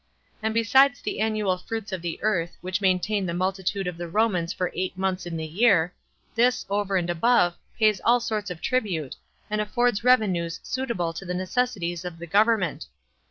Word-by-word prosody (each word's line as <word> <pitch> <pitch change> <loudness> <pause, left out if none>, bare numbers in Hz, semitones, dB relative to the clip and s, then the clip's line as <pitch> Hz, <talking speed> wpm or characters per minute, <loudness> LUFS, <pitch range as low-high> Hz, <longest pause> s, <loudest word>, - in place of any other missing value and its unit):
And 220 0 0
besides 245 +3 +4
the - - -4
annual 215 -4 0
fruits 220 +2 -5
of 190 -2 -3
the 170 -1 -4
earth, 175 -6 0
which 185 +2 -2
maintain 190 +1 +1
the 170 - -2
multitude 190 +1 -1
of 180 -1 -4
the 175 - -4
Romans 180 -3 +1
for 180 - -2
eight 185 0 -3
months 185 -1 -1
in 165 -1 -4
the 160 - -3
year, 180 -1 +3 0.4
this, 250 +2 +2
over 200 -1 0
and 175 -2 -1
above, 175 0 +3 0.2
pays 215 -4 +3
all 240 +1 +5
sorts 215 -3 -3
of 175 -2 -7
tribute, 185 - -1 0.3
and 210 0 -1
affords 235 0 +1
revenues 185 -9 +2
suitable 235 -11 -2
to 165 - -7
the 180 -1 -4
necessities 185 -3 -1
of 180 -2 -6
the 170 - -7
government. 200 -4 +2
190 Hz, 180 wpm, -25 LUFS, 175-220 Hz, 0.4 s, all